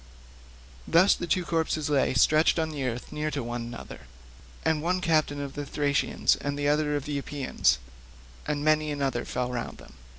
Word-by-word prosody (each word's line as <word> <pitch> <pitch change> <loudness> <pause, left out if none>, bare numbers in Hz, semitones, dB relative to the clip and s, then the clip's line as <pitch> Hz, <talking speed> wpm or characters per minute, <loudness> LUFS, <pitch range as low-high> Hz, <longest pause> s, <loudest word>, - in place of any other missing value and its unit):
Thus 185 +4 +6
the 175 - -4
two 180 +2 +1
corpses 160 -2 0
lay 140 -3 +2
stretched 155 +6 +4
on 160 -1 -1
earth 125 -3 -3
near 150 0 -2
to 140 -4 -3
one 120 +1 -4
another, 115 - -9 0.6
the 160 0 +3
one 180 +4 0
captain 155 -4 +1
of 140 -1 -5
the 145 - -4
Thracians 145 0 +1
and 145 0 -4
the 145 0 0
other 150 0 +2
of 145 -1 -3
the 145 -2 -2
Epeans; 140 -1 +1 0.7
and 145 0 -1
many 155 0 +3
another 135 -4 -1
fell 125 0 -2
round 120 -1 -4
them. - - -15
145 Hz, 175 wpm, -27 LUFS, 135-155 Hz, 0.7 s, Thus